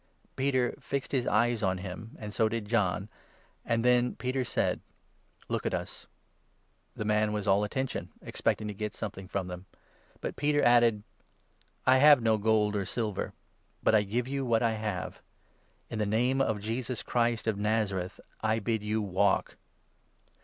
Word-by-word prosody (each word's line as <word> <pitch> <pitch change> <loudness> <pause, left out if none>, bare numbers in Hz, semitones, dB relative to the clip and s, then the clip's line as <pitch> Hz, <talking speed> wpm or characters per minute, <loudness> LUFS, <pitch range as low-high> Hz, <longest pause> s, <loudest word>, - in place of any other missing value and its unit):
Peter 130 -2 +1
fixed 140 -1 -3
4 - - 0
his 125 - -4
eyes 115 +1 +2
on 95 0 +1
him, 95 +4 -7
and 105 -1 -7
so 110 0 +2
did 115 -1 -3
John, 100 -3 +1 0.6
and 115 0 0
then 125 0 +3
Peter 130 +1 -1
said: - - 0 0.7
"Look - - -2
at - - 0
us." - - -7 0.9
The 105 - -4
man 105 0 +2
was 105 -1 -3
all 100 +1 +4
attention, 115 -5 -3
expecting 105 - -1
to 105 - -4
get 105 +1 -4
something 95 -2 -6
from 100 +1 -2
5 - - -9
them; 90 +1 -7 0.5
but - - -4
Peter 145 0 +2
added: 120 -3 +5 0.2
6 - - -41
" - - -39
I - - +6
have 145 0 +8
no 110 -2 +2
gold 105 -1 +2
or 100 - 0
silver, 110 -3 -3 0.5
but - - +4
I 110 - +6
give 115 +5 -2
you 135 0 -2
what 115 -2 +2
I 115 - +3
have. 105 -4 -4 0.7
In 110 - -5
the 105 - +1
Name 125 +6 +2
of 110 -5 +1
Jesus 115 +3 -3
Christ 120 -1 +1
of 110 -3 0
Nazareth 100 -3 -1 0.2
I 110 0 +2
bid 110 0 -1
you 105 +1 -1
walk." 100 +1 +1
110 Hz, 175 wpm, -30 LUFS, 105-120 Hz, 0.9 s, have